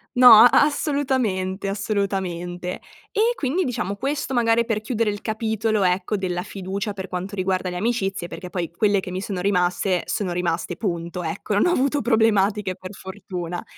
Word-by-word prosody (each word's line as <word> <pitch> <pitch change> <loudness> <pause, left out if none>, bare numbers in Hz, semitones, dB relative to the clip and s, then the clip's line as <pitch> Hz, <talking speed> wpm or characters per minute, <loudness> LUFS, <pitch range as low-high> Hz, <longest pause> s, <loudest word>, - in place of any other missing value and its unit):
No, 250 0 +7
a 220 +2 +10
assolutamente, 255 - +1
assolutamente. 190 -4 -3 0.3
E 455 +3 +2
quindi 310 - 0
diciamo, 225 - -2
questo 270 +4 -3
magari 235 -1 +3
per 225 -2 -1
chiudere 225 -1 0
il 205 0 -4
capitolo, 220 -1 -1
ecco, 185 +3 +1
della 180 -2 -2
fiducia 195 +3 -4
per 195 -1 -6
quanto 185 +2 -5
riguarda 185 -1 -1
le 180 - -5
amicizie, 195 -4 -1
perché 180 0 -8
poi 175 -2 -3
quelle 200 +3 +2
che 185 - -6
mi 185 +1 -4
sono 195 -2 -4
rimaste, 180 -1 +1
sono 190 -4 -2
rimaste 175 0 -2
punto, 170 -3 -3
ecco, 165 +5 -3
non 205 - +3
ho - - +3
avuto 280 -2 +1
problematiche 210 -4 +2
per 185 +1 -9
fortuna. 185 -3 -6
200 Hz, 165 wpm, -23 LUFS, 180-225 Hz, 0.3 s, a